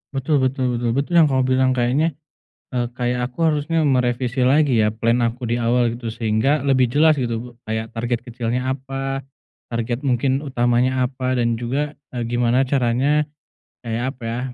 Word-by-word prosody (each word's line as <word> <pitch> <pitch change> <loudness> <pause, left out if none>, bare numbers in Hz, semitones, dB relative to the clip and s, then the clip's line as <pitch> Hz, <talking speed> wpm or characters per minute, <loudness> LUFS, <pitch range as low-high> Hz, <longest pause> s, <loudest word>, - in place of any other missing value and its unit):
Betul 140 +2 +1
betul 130 -2 0
betul 120 -1 0
betul 140 +5 -1
yang 160 - +6
kamu 130 -2 +1
bilang 130 0 +2
kayaknya, 135 +6 +1 0.6
eee, 120 -1 0
kayak 125 0 -2
aku 165 +6 +1
harusnya 155 +1 0
merevisi 125 -1 +1
lagi 140 +1 +3
ya 105 - +2
plan 115 +2 +1
aku 120 +1 -2
di 115 - 0
awal, 120 +1 +2
gitu, 120 -2 -5
sehingga 115 +6 +1
lebih 130 -3 +3
jelas, 155 +3 +5
gitu, 120 -2 -3
kayak 110 +1 -4
target 120 +1 -1
kecilnya 120 +1 -2
apa, 135 0 -4 0.5
target 120 +3 -2
mungkin 135 +1 +1
utamanya 125 -1 +1
apa, 130 0 -2
dan 115 -1 +1
juga, 135 +6 -2 0.2
eee, 120 -2 -3
gimana 120 +2 +2
caranya 135 +3 +2 0.6
kayak 115 0 -2
apa, 125 - -14
ya, 115 +1 -2
125 Hz, 165 wpm, -21 LUFS, 120-135 Hz, 0.6 s, yang